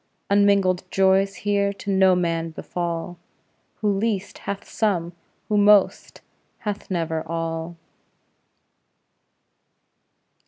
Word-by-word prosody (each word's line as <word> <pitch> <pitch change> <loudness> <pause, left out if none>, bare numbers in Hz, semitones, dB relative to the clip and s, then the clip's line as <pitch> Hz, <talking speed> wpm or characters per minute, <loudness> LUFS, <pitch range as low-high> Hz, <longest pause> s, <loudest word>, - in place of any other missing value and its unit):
Unmingled 200 -3 +3
joys 195 +1 +2
here 200 -1 +2
to 200 0 -5
no 190 -1 +4
man 165 -2 -1
befall; 170 +1 -5 0.6
Who 210 -1 +2
least, 205 0 -2
hath 200 -1 -5
some; 180 -6 -1 0.3
who 210 - +1
most, 205 -1 +3 0.4
hath 210 -1 -5
never 165 -3 -1
all. 165 +1 -4
190 Hz, 90 wpm, -23 LUFS, 170-200 Hz, 0.6 s, no